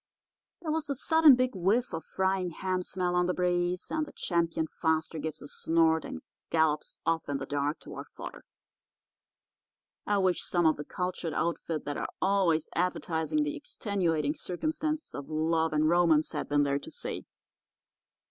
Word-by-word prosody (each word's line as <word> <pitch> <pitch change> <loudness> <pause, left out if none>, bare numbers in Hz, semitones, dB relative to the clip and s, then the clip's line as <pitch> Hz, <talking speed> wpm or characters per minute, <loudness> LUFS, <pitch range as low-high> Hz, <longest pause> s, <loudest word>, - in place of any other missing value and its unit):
"There 315 - -1
was 310 -2 -1
a 280 - 0
sudden 320 +1 +6
big 255 0 +1
whiff 200 +7 +1
of 165 - -3
frying 190 -1 0
ham 185 +2 -2
smell 180 0 -2
on 180 0 +2
the 180 - 0
breeze; 180 0 0
and 315 - +1
the - - -10
Champion 170 -2 0
Faster 160 0 -1
gives 155 0 -4
a - - -8
snort 160 +1 +2
and 80 - -7 0.3
gallops 160 -2 +1
off 165 -2 0
in 140 - 0
the 135 - -5
dark 145 +2 -1
toward - - -8
fodder. - - -9 1.6
"I 205 - +3
wish 185 -2 +2
some 175 -2 +1
of 155 - +4
the 150 - -6
cultured 180 -3 -3
outfit 165 -2 -1
that 145 0 -3
are - - -3
always 185 -5 +2
advertising 170 - 0
the 295 +1 -2
extenuating 175 - -1
circumstances 310 - -3
of 140 - -7
love 160 +1 +1
and 155 0 +2
romance 165 -2 +4
had - - -4
been 145 0 +3
there 140 0 +1
to - - -9
see. - - -3
170 Hz, 165 wpm, -30 LUFS, 155-190 Hz, 1.6 s, sudden